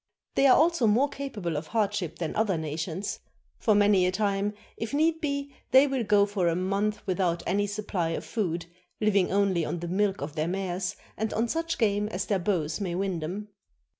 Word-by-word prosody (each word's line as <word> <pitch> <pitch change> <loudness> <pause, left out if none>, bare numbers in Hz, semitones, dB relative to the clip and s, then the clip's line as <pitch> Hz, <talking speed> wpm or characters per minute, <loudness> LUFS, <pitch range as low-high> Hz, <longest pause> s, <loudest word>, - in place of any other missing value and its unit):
They 275 - +4
are 255 - +7
also 330 -6 +3
more 245 +7 +3
capable 225 - -4
of 155 +2 -3
hardship 200 -6 -1
than 165 -3 -3
other 210 -5 +1
nations; 160 +4 -3 0.4
for 215 -3 +3
many 205 -3 +4
a - - +1
time, 200 +1 0 0.2
if 225 +5 -4
need 320 +2 +2
be, 280 -2 -2 0.2
they 265 +2 +7
will 270 -3 -1
go 205 -1 +4
for 200 -3 0
a 165 - +2
month 195 +4 -1
without 180 -2 0
any 205 +2 +1
supply 200 -5 -2
of 165 - -3
food, 175 -7 -2 0.3
living 205 -3 +2
only 195 -3 +2
on 175 - -2
the 175 +1 -5
milk 195 +2 0
of 145 +1 -4
their 155 0 -1
mares 185 0 -2 0.2
and 220 0 -1
on 225 +2 +1
such 330 +5 -2
game 210 -2 +1
as 200 -2 -3
their 200 -3 +1
bows 170 -2 -1
may 180 -3 -2
win 190 -2 -1
them. 190 +7 -5
200 Hz, 195 wpm, -27 LUFS, 175-220 Hz, 0.4 s, are